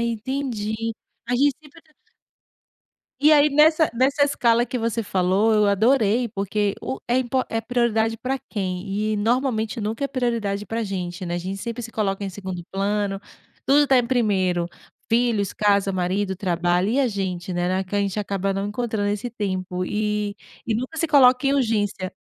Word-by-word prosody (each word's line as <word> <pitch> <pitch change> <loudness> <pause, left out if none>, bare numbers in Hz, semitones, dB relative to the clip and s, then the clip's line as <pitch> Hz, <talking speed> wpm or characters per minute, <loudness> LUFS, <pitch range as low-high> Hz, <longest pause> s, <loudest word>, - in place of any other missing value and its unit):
entendi. 235 -1 -2 0.5
A 250 - 0
gente 280 +2 +3
sempre 300 +1 -17
é - - -18
trat 310 -1 -29 1.3
E 300 +2 +6
aí 300 0 +6
nessa 310 +2 +4
nessa 270 +4 +2
escala 240 -4 +2
que 250 +2 -3
você 230 0 -1
falou, 195 +3 +2
eu 210 -1 +4
adorei, 225 +2 +3
porque 200 0 -1
o 130 +1 -4
é 245 - +2
impor 255 +1 0
é 225 0 -2
prioridade 225 -2 +1
para 265 +1 -2
quem? 185 -2 -3 0.3
E - - 0
normalmente 225 0 0
nunca 220 +6 -2
é - - +2
prioridade 230 -6 -2
para 230 +1 -3
a - - -1
gente, 180 -2 -4
né, 175 - -3
a - - -1
gente 185 +3 -4
sempre 235 +4 -5
se 230 - -7
coloca 200 -3 -1
em 195 - -2
segundo 185 -2 -6
plano. 200 0 -1 0.5
Tudo 290 +2 +5
está 275 -2 +4
em 240 - +1
primeiro, 190 -8 +1 0.4
filhos, 230 -4 +1
casa, 200 -1 +2
marido, 190 +1 -1
trabalho. 180 0 0
E 260 +4 +2
a 265 - +2
gente, 190 -4 -3
né? 175 0 0
Na 185 +1 0
que 190 +2 -4
a - - +2
gente 200 +1 -1
acaba 195 -1 -1
não 195 +1 -2
encontrando 215 -1 -2
esse 210 +4 -3
tempo, 185 -4 -3
e 210 +1 -2 0.3
e 225 - 0
nunca 255 +8 -4
se 330 - +1
coloca 265 -2 +5
em 275 - +3
urgência. 205 -7 0
215 Hz, 185 wpm, -23 LUFS, 195-245 Hz, 1.3 s, E